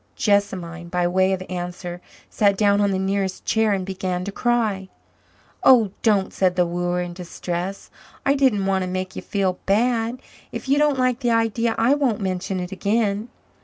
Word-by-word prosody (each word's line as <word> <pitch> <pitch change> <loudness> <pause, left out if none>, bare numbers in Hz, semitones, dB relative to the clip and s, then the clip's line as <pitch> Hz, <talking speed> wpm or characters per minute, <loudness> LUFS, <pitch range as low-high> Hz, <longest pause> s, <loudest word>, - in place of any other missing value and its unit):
Jessamine, 185 -5 0
by 180 0 +1
way 185 +2 +2
of 185 -1 -1
answer, 175 0 -5 0.3
sat 200 -2 +2
down 205 0 +3
on 200 - +3
the 190 - 0
nearest 190 0 -2
chair 220 -1 +2
and 190 -2 -1
began 185 -1 -3
to 200 - -4
cry. 215 -5 0 0.7
"Oh, 230 -7 +6
don't," 205 -4 +2
said 185 -2 +1
the 180 -1 +3
wooer 175 +1 -1
in 175 0 -6
distress. 180 +1 -5 0.3
"I 275 - +4
didn't 260 -8 +2
want 190 -1 +1
to - - -3
make 185 0 -4
you - - -5
feel 190 -3 -1
bad. 230 +3 +1 0.3
If - - -6
you 280 +2 +3
don't 295 -2 +3
like 255 -1 +1
the 245 -3 0
idea, 230 0 +1
I 230 +4 +4
won't 275 -7 +1
mention 190 -1 -2
it 180 +1 -5
again." 205 +2 0
195 Hz, 180 wpm, -22 LUFS, 185-225 Hz, 0.7 s, Oh